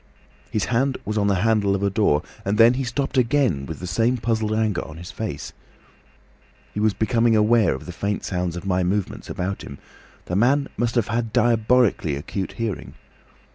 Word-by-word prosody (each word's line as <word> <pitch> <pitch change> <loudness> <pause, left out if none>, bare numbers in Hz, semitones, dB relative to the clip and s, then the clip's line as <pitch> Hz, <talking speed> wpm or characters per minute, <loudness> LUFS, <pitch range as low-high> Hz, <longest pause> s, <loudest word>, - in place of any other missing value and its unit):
"His 110 -3 -1
hand 130 +3 +1
was 105 - -2
on 105 -1 +2
the 100 - +3
handle 105 -3 +2
of 100 - -3
a 100 - +1
door, 95 -8 +2 0.2
and 100 +2 -1
then 115 +2 +7
he 135 +1 -2
stopped 135 +2 -1
again 120 - +1
with 80 - -6
the 90 - -7
same 115 +8 +1
puzzled 110 -2 -1
anger 110 -4 0
on 80 - -10
his 85 +2 -8
face. 110 -3 -5 1.2
He - - -3
was 105 -2 +2
becoming 115 +2 +2
aware 110 +1 +4
of - - -9
the 90 - -6
faint 100 +3 -3
sounds 90 -2 -2
of 85 - -6
my 95 -1 +1
movements 95 +2 -2
about 95 +2 -3
him. 70 - -9 0.5
The 90 - -3
man 135 +7 +3
must 120 0 -1
have 120 -4 +1
had 115 0 -1
diabolically 115 - +2
acute 95 +7 -4
hearing. 115 -4 -4
110 Hz, 190 wpm, -23 LUFS, 95-120 Hz, 1.2 s, then